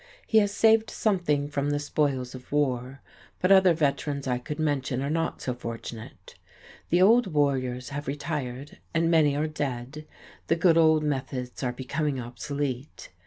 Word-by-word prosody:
He 220 - +4
has 205 -1 +1
saved 220 +1 +4
something 175 -9 0
from 145 -1 -2
the 145 - +1
spoils 140 -3 -1
of 130 -1 -11
war, 135 -2 -1 0.4
but 185 - +2
other 190 -3 +6
veterans 145 -2 -1
I 125 -2 0
could 150 +4 -6
mention 140 -4 -1
are 140 - -2
not 165 +1 -2
so 125 - -1
fortunate. 115 -1 -8 0.6
The 175 +2 +4
old 230 +3 +5
warriors 130 -3 0
have 145 0 -6
retired, 145 -2 -4 0.2
and 165 +1 +2
many 150 -4 +4
are 150 +2 0
dead; 145 -1 -5 0.4
the 165 - +3
good 165 0 +4
old 160 -2 +4
methods 130 -3 -3
are 125 -2 0
becoming 135 +2 -2
obsolete. 130 +2 -5
145 Hz, 160 wpm, -27 LUFS, 130-160 Hz, 0.6 s, other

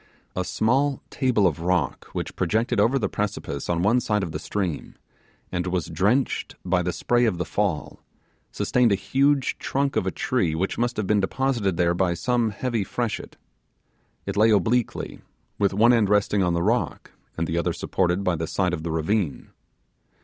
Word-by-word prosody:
A 90 - 0
small 130 +8 +1
table 125 -6 +2
of 80 -5 +1
rock 85 -5 0
which - - -5
projected 110 +5 0
over 115 +6 +3
the 120 - 0
precipice 100 -9 -4
on 85 0 +1
one 115 +5 +4
side 105 -4 0
of 85 - -4
the 75 - -4
stream, 90 -2 -3 0.6
and 90 0 -2
was 90 -2 -2
drenched 105 - 0
by 90 0 +2
the 90 0 -1
spray 120 +6 +1
of 105 -6 +1
the 90 - -2
fall, 85 -1 -2 0.5
sustained 125 -3 +2
a - - +4
huge 135 +7 +1
trunk 140 0 -1
of 95 - 0
a - - +1
tree 90 -11 0
which 95 +7 -2
must 120 0 0
have 105 - -1
been 105 +2 +2
deposited 105 -3 0
there 85 -1 +3
by 90 -1 +1
some 120 +3 +1
heavy 115 +1 -2
freshet. 115 +2 -4 0.9
It 100 - -3
lay 110 +2 +5
obliquely, 110 +4 0 0.4
with 100 -2 +3
one 115 +5 +5
end 110 -4 +3
resting 105 -1 +2
on 90 -2 +2
the 85 - 0
rock 115 +5 -1 0.3
and 85 - 0
the 80 +1 -1
other 85 - 0
supported 90 +1 0
by 90 -3 +1
the 80 +1 -3
side 90 0 0
of 85 - -2
the 85 - -4
ravine. 80 - -1
100 Hz, 185 wpm, -24 LUFS, 90-120 Hz, 0.9 s, lay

